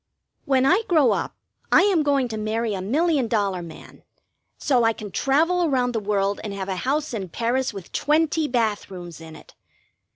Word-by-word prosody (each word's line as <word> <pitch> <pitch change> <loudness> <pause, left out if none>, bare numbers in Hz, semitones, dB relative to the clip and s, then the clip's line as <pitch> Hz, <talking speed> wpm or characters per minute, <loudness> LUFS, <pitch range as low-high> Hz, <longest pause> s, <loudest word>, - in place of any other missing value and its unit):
When 265 -1 +2
I 370 +10 +4
grow 310 -7 +4
up - - -2 0.4
I - - +6
am 390 -5 +3
going 280 -3 +1
to 220 - -4
marry 215 +1 -2
a 190 - -3
million 285 - +1
dollar 200 -5 0
man, 165 -2 -12 0.6
so 255 -5 +2
I 225 0 +3
can 210 -2 -9
travel 325 - +2
around 255 -6 +1
the 230 - -1
world 200 -1 -1
and 205 -2 -5
have 195 -1 -5
a 190 - -2
house 285 - -1
in 195 -5 -4
Paris 240 +7 -1
with 195 -4 -10
twenty 310 +1 +1
bath 225 -5 -1
rooms 175 -4 -9
in 160 -1 -11
it. - - -16
235 Hz, 190 wpm, -23 LUFS, 200-290 Hz, 0.6 s, I